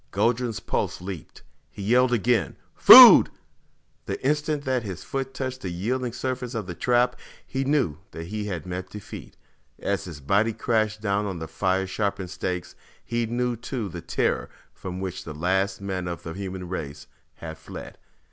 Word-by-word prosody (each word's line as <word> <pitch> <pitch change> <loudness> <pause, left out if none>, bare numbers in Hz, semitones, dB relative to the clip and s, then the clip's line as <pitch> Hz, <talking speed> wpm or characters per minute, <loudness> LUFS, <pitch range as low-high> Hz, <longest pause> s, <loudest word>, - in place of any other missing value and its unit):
Guldran's 120 -2 0
pulse - - -2
leaped. 90 -3 -8 0.3
He 100 - -9
yelled 125 +4 +3
again, 115 - +1 0.2
"Food!" - - +11 0.8
The - - -3
instant 150 0 0
that 130 -1 +1
his 95 -5 -7
foot 135 -1 -4
touched 130 -1 -5
the 95 - -4
yielding 120 +8 -2
surface 130 0 -4
of 110 -4 -3
the 90 - -6
trap, 125 +5 +2 0.3
he 135 0 -2
knew 135 - 0
that 80 - -8
he 105 +3 -4
had 90 -6 -4
met 90 +1 -5
defeat. 105 -1 -10 0.4
As 100 -1 -2
his 85 -5 -8
body 100 +11 +1
crashed 110 -2 0
down 100 -1 0
on 95 -3 -4
the 80 -1 -6
fire 95 +4 0
sharpened 95 -1 -3
stakes, 90 -1 -4 0.3
he 120 -1 -1
knew 120 +1 -1
too 115 -2 -5
the - - -7
terror - - -1 0.2
from 90 0 -7
which 95 -2 -5
the 75 - -8
last 95 +4 0
men 95 -2 -3
of 85 -1 -5
the 80 - -6
human 95 -1 -6
race 75 -5 -6 0.3
had 80 -1 -8
fled. 80 - -10
100 Hz, 170 wpm, -25 LUFS, 90-120 Hz, 0.8 s, Food